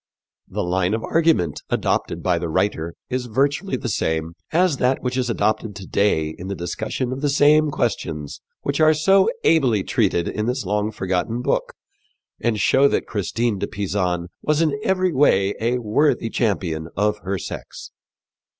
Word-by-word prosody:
The -, -, -3 dB
line 90 Hz, +3 st, +1 dB
of 115 Hz, -, -4 dB
argument 160 Hz, -, +1 dB
adopted -, -, -1 dB
by 90 Hz, -2 st, +2 dB
the 85 Hz, -1 st, -3 dB
writer 85 Hz, -1 st, -1 dB, 0.2 s
is 125 Hz, -1 st, -2 dB
virtually 140 Hz, -, 0 dB
the -, -, -5 dB
same 80 Hz, -5 st, -1 dB, 0.2 s
as 170 Hz, -3 st, +2 dB
that 130 Hz, +1 st, +1 dB
which 125 Hz, 0 st, -1 dB
is 125 Hz, -2 st, 0 dB
adopted 110 Hz, -2 st, 0 dB
to 95 Hz, -, -8 dB
day 85 Hz, -7 st, +1 dB
in 90 Hz, -, -6 dB
the 100 Hz, -, -3 dB
discussion 110 Hz, +8 st, -3 dB
of 130 Hz, -, -6 dB
the 145 Hz, -, +1 dB
same 150 Hz, +2 st, +4 dB
questions 80 Hz, -, -3 dB, 0.2 s
which 140 Hz, +1 st, -1 dB
are 155 Hz, 0 st, +6 dB
so 195 Hz, -, +4 dB
ably 125 Hz, -11 st, +3 dB
treated 85 Hz, -1 st, +1 dB
in 105 Hz, +1 st, -2 dB
this 125 Hz, -2 st, -2 dB
long 105 Hz, +2 st, 0 dB
forgotten 95 Hz, +4 st, -2 dB
book -, -, -1 dB, 0.6 s
and 115 Hz, -3 st, 0 dB
show 135 Hz, +7 st, +4 dB
that -, -, 0 dB
Christine 110 Hz, +1 st, -1 dB
de -, -, -2 dB
Pisan 90 Hz, -3 st, -2 dB
was 150 Hz, 0 st, +1 dB
in 165 Hz, -2 st, +2 dB
every 185 Hz, -4 st, +1 dB
way 100 Hz, -8 st, +3 dB
a 120 Hz, +2 st, +1 dB
worthy 115 Hz, +1 st, +1 dB
champion 85 Hz, -8 st, -1 dB
of 105 Hz, +1 st, +1 dB
her 95 Hz, 0 st, -3 dB
sex. -, -, -8 dB
110 Hz, 170 wpm, -22 LUFS, 95-140 Hz, 0.6 s, are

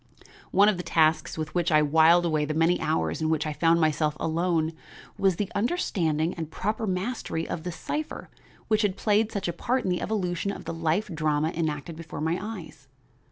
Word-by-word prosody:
One 200 Hz, +2 st, +5 dB
of 210 Hz, -3 st, +3 dB
the -, -, -3 dB
tasks 160 Hz, -2 st, +2 dB
with 155 Hz, -1 st, -4 dB
which 175 Hz, -1 st, +1 dB
I 155 Hz, -1 st, +5 dB
whiled 160 Hz, +3 st, +5 dB
away 155 Hz, -3 st, +1 dB
the 150 Hz, +1 st, -2 dB
many 165 Hz, +2 st, +2 dB
hours 160 Hz, +1 st, 0 dB
in 155 Hz, -, +1 dB
which 160 Hz, -1 st, +1 dB
I 155 Hz, -, -2 dB
found 165 Hz, +2 st, +3 dB
myself 155 Hz, -1 st, +1 dB
alone 165 Hz, 0 st, 0 dB, 0.4 s
was 190 Hz, -2 st, +2 dB
the 200 Hz, +2 st, -3 dB
understanding 185 Hz, -, 0 dB
and 160 Hz, -2 st, -5 dB
proper 215 Hz, +6 st, -2 dB
mastery 185 Hz, -3 st, -2 dB
of 160 Hz, -, -4 dB
the 180 Hz, +2 st, -4 dB
cipher 300 Hz, -, -5 dB, 0.4 s
which 215 Hz, -1 st, +2 dB
had 200 Hz, -3 st, 0 dB
played 215 Hz, +1 st, +2 dB
such 200 Hz, -4 st, -3 dB
a 170 Hz, -, -1 dB
part 255 Hz, +8 st, -1 dB
in 185 Hz, -, 0 dB
the 180 Hz, -, -1 dB
evolution 185 Hz, -3 st, -1 dB
of -, -, -8 dB
the -, -, -4 dB
life 165 Hz, +5 st, 0 dB
drama 155 Hz, -1 st, +1 dB
enacted 160 Hz, -1 st, -3 dB
before 160 Hz, -2 st, -8 dB
my 160 Hz, +3 st, 0 dB
eyes. 180 Hz, -10 st, -8 dB
165 Hz, 200 wpm, -26 LUFS, 155-195 Hz, 0.4 s, One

